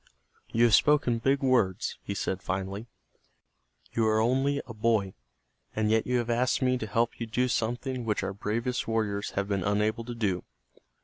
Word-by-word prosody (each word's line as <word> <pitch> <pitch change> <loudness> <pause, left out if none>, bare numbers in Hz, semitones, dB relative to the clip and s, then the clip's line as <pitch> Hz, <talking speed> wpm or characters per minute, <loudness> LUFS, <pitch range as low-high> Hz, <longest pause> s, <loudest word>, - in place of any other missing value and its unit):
"You 115 - +3
have 120 -2 +5
spoken 140 -6 +4
big 135 +3 +1
words," 115 -7 +1
he 100 - -5
said, 95 0 -2
finally. 95 +4 -3 1.1
"You 115 -1 +2
are 110 0 +3
only 135 +5 +2
a 115 - -8
boy, 110 -3 +1 0.6
and 110 0 +1
yet 110 0 +2
you 125 0 +2
have 120 -1 -2
asked 120 +1 +2
me 130 -1 +2
to 110 - -4
help 115 +3 0
you 115 - -3
do 125 +3 +1
something 120 +2 -2
which 105 -2 -1
our 100 - -2
bravest 115 +5 -2
warriors 105 -2 -1
have 100 0 0
been 100 -2 -1
unable 105 +3 0
to 120 0 -6
do. 100 -6 -1
115 Hz, 180 wpm, -28 LUFS, 105-125 Hz, 1.1 s, have